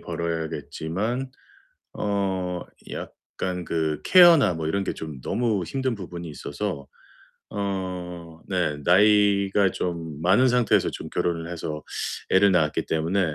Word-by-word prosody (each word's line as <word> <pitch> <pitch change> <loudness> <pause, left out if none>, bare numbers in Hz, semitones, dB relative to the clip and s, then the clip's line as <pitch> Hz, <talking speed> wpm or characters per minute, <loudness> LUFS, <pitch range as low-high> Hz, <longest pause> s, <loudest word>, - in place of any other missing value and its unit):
벌어야겠지만 85 - -3 0.6
어 95 -3 -1 0.3
약간 90 -1 -5
그 80 -2 -1
케어나 165 - +7
뭐 80 -1 -3
이런 100 +4 0
게 - - -3
좀 75 -5 -7
너무 110 -6 0
힘든 130 +1 -2
부분이 85 -4 -7
있어서 75 0 -5 0.6
어 95 -3 -3 0.4
네 90 -6 0
나이가 100 0 +4
좀 80 -4 -4
많은 100 +9 +5
상태에서 125 -1 +3
좀 - - -7
결혼을 85 -1 -2
해서 80 -3 -5 0.5
애를 95 +1 +5
낳았기 80 -4 +1
때문에 80 +1 0
90 Hz, 245 characters per minute, -25 LUFS, 80-100 Hz, 0.6 s, 케어나